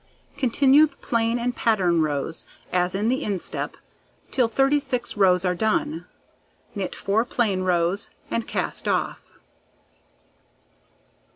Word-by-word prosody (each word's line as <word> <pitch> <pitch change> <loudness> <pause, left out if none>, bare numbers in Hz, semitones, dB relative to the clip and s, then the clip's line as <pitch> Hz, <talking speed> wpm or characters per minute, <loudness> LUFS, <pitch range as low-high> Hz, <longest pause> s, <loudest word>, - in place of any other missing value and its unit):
Continue 275 +4 +4
the - - -22
plain 230 0 0
and 245 0 -2
pattern 180 -7 +2
rows 150 +1 -2 0.3
as 180 0 +1
in 205 +3 0
the 260 +3 0
instep 195 -4 -3 0.5
till 250 -3 +2
36 270 +1 0
rows 185 -3 +3
are 180 - +2
done; 220 - -1 0.7
knit 195 -4 -4
4 205 +3 +1
plain 220 -6 0
rows, 180 +2 0 0.2
and 230 - -1
cast - - -3
off. - - -2
220 Hz, 115 wpm, -24 LUFS, 180-245 Hz, 0.7 s, Continue